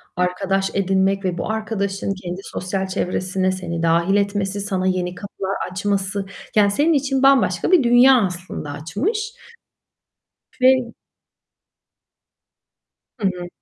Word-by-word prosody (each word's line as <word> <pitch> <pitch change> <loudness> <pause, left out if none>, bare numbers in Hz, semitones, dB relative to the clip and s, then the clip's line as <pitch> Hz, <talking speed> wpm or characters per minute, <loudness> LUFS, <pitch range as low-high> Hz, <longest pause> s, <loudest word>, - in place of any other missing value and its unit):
arkadaş 195 +2 0
edinmek 195 0 +1
ve 180 -2 -1
bu 170 - -2
arkadaşın 200 -3 -2
kendi 185 -1 -7
sosyal 190 +1 -3
çevresine 185 0 -1
seni 170 -3 -4
dâhil 170 +3 +2
etmesi, 200 0 0
sana 190 -2 -1
yeni 180 -1 -1
kapılar 195 0 -5 0.2
açması, 195 +1 -1 0.3
yani, 205 -2 +5
senin 300 +10 +2
için 270 -2 0
bambaşka 265 - +3
bir 350 -7 +6
dünya, 245 +1 +6
aslında 180 -5 -6
açmış. 270 - -3 1.3
Ve 260 +1 +7 2.5
Hı 200 - +1
hı. 180 -2 -4
195 Hz, 115 wpm, -21 LUFS, 185-210 Hz, 2.5 s, Ve